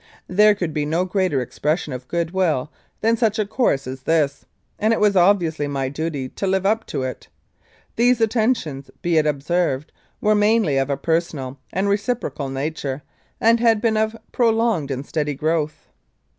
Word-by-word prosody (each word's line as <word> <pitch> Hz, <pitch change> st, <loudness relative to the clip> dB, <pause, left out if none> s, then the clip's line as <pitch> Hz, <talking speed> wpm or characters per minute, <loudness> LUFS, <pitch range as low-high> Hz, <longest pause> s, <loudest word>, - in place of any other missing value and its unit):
There 210 Hz, +3 st, +5 dB
could 175 Hz, -6 st, -3 dB
be 150 Hz, -, 0 dB
no 165 Hz, +5 st, 0 dB
greater 185 Hz, -8 st, 0 dB
expression 150 Hz, +4 st, -2 dB
of 125 Hz, 0 st, -7 dB
goodwill 170 Hz, -4 st, 0 dB, 0.3 s
than 225 Hz, +1 st, +3 dB
such 225 Hz, -2 st, +1 dB
a 215 Hz, -, +1 dB
course 200 Hz, -, +1 dB
as 130 Hz, +1 st, -6 dB
this, 150 Hz, -1 st, 0 dB, 0.3 s
and 220 Hz, +2 st, +3 dB
it -, -, 0 dB
was 210 Hz, -1 st, +3 dB
obviously 175 Hz, -5 st, +3 dB
my 135 Hz, -2 st, -2 dB
duty 145 Hz, -2 st, -3 dB
to 195 Hz, -, -4 dB
live 190 Hz, 0 st, +1 dB
up 220 Hz, +3 st, +1 dB
to 130 Hz, -, -3 dB
it. 130 Hz, -1 st, -5 dB, 0.7 s
These 245 Hz, +1 st, +4 dB
attentions, 220 Hz, -, 0 dB
be 170 Hz, -2 st, +2 dB
it 155 Hz, -1 st, +3 dB
observed, 150 Hz, 0 st, 0 dB, 0.3 s
were 215 Hz, -, +3 dB
mainly 210 Hz, -8 st, +3 dB
of 135 Hz, +1 st, +1 dB
a 140 Hz, -, 0 dB
per 160 Hz, +3 st, +2 dB
sonal 140 Hz, -6 st, -7 dB
and 190 Hz, +3 st, 0 dB
reciprocal 200 Hz, -, -1 dB
nature, 140 Hz, 0 st, -3 dB, 0.4 s
and 230 Hz, +1 st, +4 dB
had 225 Hz, -2 st, +4 dB
been 225 Hz, 0 st, +1 dB
of 220 Hz, +1 st, 0 dB
prolonged 225 Hz, -, +1 dB
and 135 Hz, 0 st, -3 dB
steady 150 Hz, -2 st, -2 dB
growth. 155 Hz, +1 st, -1 dB
170 Hz, 170 wpm, -21 LUFS, 145-210 Hz, 0.7 s, There